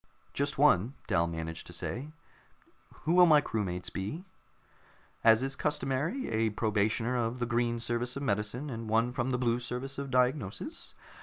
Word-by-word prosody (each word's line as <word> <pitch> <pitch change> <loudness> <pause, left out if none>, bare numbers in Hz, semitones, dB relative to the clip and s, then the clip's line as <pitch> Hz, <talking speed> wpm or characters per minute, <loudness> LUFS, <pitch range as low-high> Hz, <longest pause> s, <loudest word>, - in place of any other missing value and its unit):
"Just 145 +1 -1
one," 135 -3 +4
Dal 85 -6 +2
managed 80 0 -5
to - - -10
say. 130 +5 -4 1.0
"Who 165 - +1
will 180 0 +7
my 155 -2 +7
crewmates 95 -9 -3
be?" 145 - -4 1.0
"As 115 +2 +6
is 135 +1 -1
customary, 150 - -1
a 110 0 +1
probationer 110 +3 0
from 120 +2 -5
the 120 - -1
Green 120 0 0
Service 120 +1 -1
of 140 - -4
Medicine 115 +5 -1
and 115 -2 -5
one 115 +2 +2
from 125 +1 -1
the 125 - +1
Blue 120 -1 +1
Service 125 +3 -5
of 140 -1 -4
Diagnosis. 125 -5 -1
120 Hz, 160 wpm, -30 LUFS, 110-135 Hz, 1.0 s, will